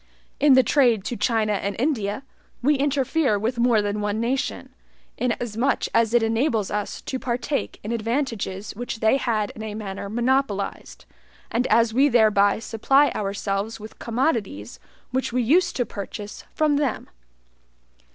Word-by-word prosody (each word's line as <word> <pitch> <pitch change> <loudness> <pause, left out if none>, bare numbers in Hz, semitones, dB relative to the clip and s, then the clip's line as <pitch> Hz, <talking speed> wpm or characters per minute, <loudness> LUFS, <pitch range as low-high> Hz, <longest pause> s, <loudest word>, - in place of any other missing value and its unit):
In 290 -1 +6
the 260 0 +6
trade 240 -5 +3
to 240 - -3
China 215 0 +1
and 200 0 -2
India, 230 -4 -1 0.4
we 295 +4 +4
interfere 275 -3 +1
with 230 +4 -2
more 235 -3 +3
than 205 +1 -2
one 210 +1 -1
nation, 250 +4 -2 0.4
inasmuch 240 +1 -1
as 230 0 +3
it 235 - +4
enables 225 -2 0
us 210 0 -3
to 260 - -4
partake 255 +3 -2
in 215 - -4
advantages 230 -4 -2
which 240 +1 -5
they 220 +4 +3
had 220 -6 -1
in 220 - -10
a 215 -1 -5
manner 200 -2 -6
monopolized, 240 -2 -1 0.5
and 245 +2 +1
as 230 0 +3
we 275 +4 +4
thereby 215 -4 +4
supply 250 +6 +2
ourselves 200 +2 -3
with 215 +1 -11
commodities 225 - -2 0.3
which 260 -1 -1
we 250 +1 +1
used 345 +9 +3
to 245 - 0
purchase 205 0 -7
from 305 -2 +2
them. 285 -5 -1
230 Hz, 150 wpm, -24 LUFS, 210-260 Hz, 0.5 s, In